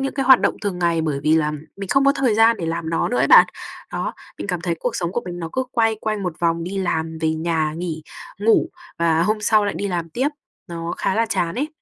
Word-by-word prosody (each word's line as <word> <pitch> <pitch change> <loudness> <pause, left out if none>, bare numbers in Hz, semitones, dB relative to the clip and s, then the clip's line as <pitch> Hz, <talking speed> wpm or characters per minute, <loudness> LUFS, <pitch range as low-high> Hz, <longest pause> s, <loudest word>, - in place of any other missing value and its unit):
những 270 0 -2
cái 270 -2 -1
hoạt 260 -2 +8
động - - +1
thường 195 -3 -2
ngày 170 -2 +1
bởi 150 -3 -2
vì 155 +1 +3
là 150 -1 +1 0.3
mình 195 -1 -6
không 275 +6 +3
có 275 - +5
thời 260 -6 +1
gian 225 +1 +5
để 165 - -3
làm 165 0 -3
nó 165 - 0
nữa 245 - -1
ấy - - +3
bạn. - - +8 0.5
Đó, - - -3 0.2
mình - - -5
cảm 180 -3 -2
thấy 170 -1 -1
cuộc - - -2
sống 170 0 -2
của 240 - -2
mình 175 -1 -5
nó 165 -2 -4
cứ 260 0 -1
quay 225 -2 +2
quanh 215 -2 -2
một 180 -2 -2
vòng 165 0 +1
đi 195 +2 -4
làm, 160 -3 -2
về 160 -1 +1
nhà, 160 -1 -1
nghỉ, 165 -2 -4 0.4
ngủ 225 +10 +3 0.3
và 165 -1 +2
hôm 210 +4 0
sau 210 0 +3
lại 205 - -2
đi 200 - -3
làm 170 -3 -3
tiếp, 260 - 0 0.4
nó 170 0 -5
khá - - 0
là 230 +1 +2
chán 175 -5 -1
ấy. 285 +6 -2
180 Hz, 265 wpm, -21 LUFS, 165-220 Hz, 0.5 s, hoạt